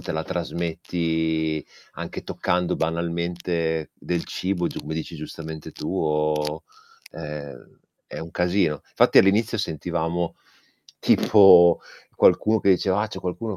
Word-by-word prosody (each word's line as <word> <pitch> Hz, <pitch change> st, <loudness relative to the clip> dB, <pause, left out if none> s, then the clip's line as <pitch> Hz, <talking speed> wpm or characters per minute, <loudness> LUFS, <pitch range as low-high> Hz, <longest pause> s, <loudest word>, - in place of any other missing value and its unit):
te -, -, -7 dB
la 80 Hz, -, -2 dB
trasmetti 80 Hz, -2 st, -2 dB, 0.3 s
anche -, -, -6 dB
toccando 90 Hz, 0 st, -1 dB
banalmente 85 Hz, -1 st, -2 dB
del 85 Hz, -1 st, -3 dB
cibo, 90 Hz, -2 st, -2 dB
come 80 Hz, -, -6 dB
dici 80 Hz, +1 st, -5 dB
giustamente 80 Hz, 0 st, -8 dB
tu, -, -, -6 dB
o 75 Hz, 0 st, 0 dB, 0.5 s
è 75 Hz, -3 st, -7 dB, 0.5 s
è -, -, -8 dB
un 80 Hz, -, -8 dB
casino. 90 Hz, -3 st, 0 dB
Infatti, -, -, +4 dB
all'inizio 110 Hz, +4 st, +3 dB
sentivamo 85 Hz, -1 st, -2 dB, 0.6 s
tipo 90 Hz, -5 st, +6 dB, 0.3 s
qualcuno 110 Hz, +1 st, +4 dB
che 100 Hz, -, +3 dB
diceva: 95 Hz, +1 st, +2 dB
"Ah, 110 Hz, -, -3 dB
c'è 100 Hz, -, -7 dB
qualcuno 100 Hz, +4 st, -4 dB
85 Hz, 120 wpm, -24 LUFS, 80-90 Hz, 0.6 s, tipo